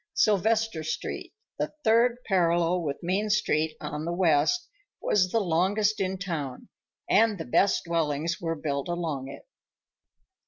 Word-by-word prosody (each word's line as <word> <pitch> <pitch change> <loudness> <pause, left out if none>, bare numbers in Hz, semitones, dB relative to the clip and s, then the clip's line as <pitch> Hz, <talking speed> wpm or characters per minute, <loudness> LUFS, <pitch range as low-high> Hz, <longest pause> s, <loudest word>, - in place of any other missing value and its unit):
Sylvester 220 - +2
Street, 155 - -4 0.3
the - - -2
third 235 +2 +4
parallel 175 -2 +2
with 145 -4 -3
Main 195 +5 0
Street 160 -7 +1
on 150 +1 -5
the 170 - -2
west, 175 - +2 0.3
was 185 -3 +2
the 230 - +2
longest 200 +4 +1
in 190 0 -1
town, 160 -9 -5 0.4
and 220 -1 +3
the 160 - -5
best 190 +10 +2
dwellings 165 -1 -1
were 165 -1 -1
built 140 -3 -3
along 165 -6 -3
it. 140 - -11
175 Hz, 135 wpm, -27 LUFS, 160-205 Hz, 0.4 s, third